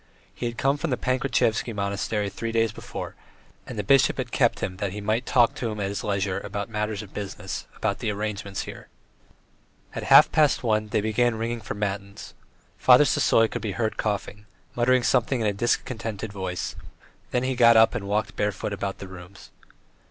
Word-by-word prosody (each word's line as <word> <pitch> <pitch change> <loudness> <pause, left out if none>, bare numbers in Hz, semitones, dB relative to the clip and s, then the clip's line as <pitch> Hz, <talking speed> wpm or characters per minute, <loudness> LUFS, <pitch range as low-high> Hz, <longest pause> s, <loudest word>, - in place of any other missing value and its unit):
He 120 - -3
had 120 0 -6
come 140 +2 +1
to 170 - -1
the 125 -5 0
Pankratievsky 125 -3 0
Monastery 100 +1 -1
three 115 +4 -4
days 115 -1 +2
before, - - -7 0.5
and 125 - -7
the 105 - -1
bishop 135 +6 +4
had 125 -3 -4
kept - - +2
him 95 - -3
that 100 -2 -3
he 105 - -5
might 110 +4 -1
talk 120 -3 +4
to 120 - -3
him 105 -1 -5
at 100 -1 -1
his 100 - -4
leisure 100 -2 -1
about 100 +3 -5
matters 105 -1 -2
of 100 - -14
business, 95 -2 -6
about - - -1
the - - -2
arrangements 105 -1 -3
here.... - - -10 1.1
At - - -4
half - - +8
past 150 -4 +3
one 110 -2 +1
they 105 - 0
began 110 +2 +1
ringing 115 +1 -3
for 105 - -5
matins. 100 0 -4 0.5
Father 130 +3 +7
Sisoy 115 -4 +3
could - - -5
be 105 -3 -3
heard 110 +4 -1
coughing, 105 0 -3 0.3
muttering 125 +1 +3
something 125 +1 +2
in 110 - -1
a 105 - +1
discontented 110 -1 -2
voice, 95 -2 -4 0.5
then 125 - 0
he 130 0 0
got 115 -2 +6
up 110 0 +6
and 100 - -4
walked 105 +2 -1
barefoot 105 0 -2
about 100 -1 -3
the 95 - -8
rooms. 95 +1 -12
110 Hz, 190 wpm, -25 LUFS, 100-120 Hz, 1.1 s, half